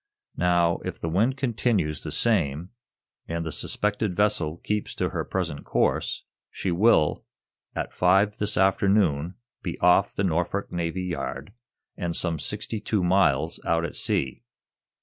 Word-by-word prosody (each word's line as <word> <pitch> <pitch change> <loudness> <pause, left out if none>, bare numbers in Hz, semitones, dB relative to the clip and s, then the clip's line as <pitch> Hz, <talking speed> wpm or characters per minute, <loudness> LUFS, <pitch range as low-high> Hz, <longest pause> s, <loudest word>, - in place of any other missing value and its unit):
Now, 85 -1 +3
if - - -5
the 80 - -3
wind 115 +10 +2
continues 110 - 0
the 75 - -5
same, 85 -4 0 0.6
and 85 0 -3
the 80 - -3
suspected 105 +3 -1
vessel 90 -6 +1
keeps 105 +3 -3
to - - 0
her - - -2
present 85 -6 -3
course, - - 0 0.3
she 95 - -3
will, 90 -4 +3 0.5
at - - -3
five 95 +3 +3
this 105 0 -1
afternoon, 95 -4 +2 0.3
be 85 - -4
off 90 +3 +4
the 100 - 0
Norfolk 90 +2 -1
Navy 85 +1 -2
Yard, 85 -2 -4 0.4
and 85 -1 -3
some 85 -3 0
sixty 105 +5 -3
two 105 -2 -1
miles 80 -4 +2
out 85 0 +1
at - - -5
sea. 65 -2 0
90 Hz, 145 wpm, -26 LUFS, 80-100 Hz, 0.6 s, off